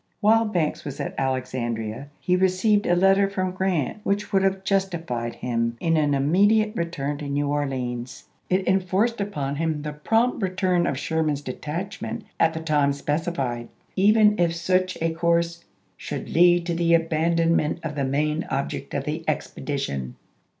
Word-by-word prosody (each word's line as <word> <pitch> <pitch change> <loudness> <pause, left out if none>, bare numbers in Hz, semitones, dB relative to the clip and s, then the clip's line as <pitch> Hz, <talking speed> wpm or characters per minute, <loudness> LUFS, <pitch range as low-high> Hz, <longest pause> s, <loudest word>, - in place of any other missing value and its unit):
While 225 +1 +4
Banks 175 -8 -1
was 145 -2 -6
at - - -4
Alexandi'ia 125 -2 -2
he 180 - +1
received 190 +3 +2
a 175 - +4
letter 195 +2 +4
from 185 -2 -2
Grant 185 -3 -1
which 200 +1 -1
would 195 - +4
have 195 0 0
justified 170 -12 -1
him 115 -1 -2
in 165 -1 +1
an 145 -2 +2
immediate 205 +10 +3
return 145 -5 -3
to 145 - -5
New 145 +1 0
Orleans. 130 -4 -3 0.3
It 185 +1 +2
en 190 +1 +4
forced 200 +5 0
upon 145 -9 -3
him 160 -2 -1
the 150 -1 -4
prompt 225 +12 +1
return 185 -2 +1
of 140 - -1
Sherman's 155 -1 -1
detachment 180 - -5 0.2
at 160 0 +3
the 160 - -3
time 150 -3 +2
specified, 140 -5 -2 0.3
even 210 +1 +4
if 170 -1 +2
such 185 +2 0
a 165 - +1
course 170 0 0 0.3
"should - - -6
lead 175 0 +4
to 170 - -1
the 170 0 +3
abandonment 165 0 +1
of 160 -2 -3
the 140 -1 -2
main 150 +4 0
object 140 +1 -3
of 140 - -1
the 155 +3 -3
expedition." 135 - -3
165 Hz, 160 wpm, -24 LUFS, 140-185 Hz, 0.3 s, While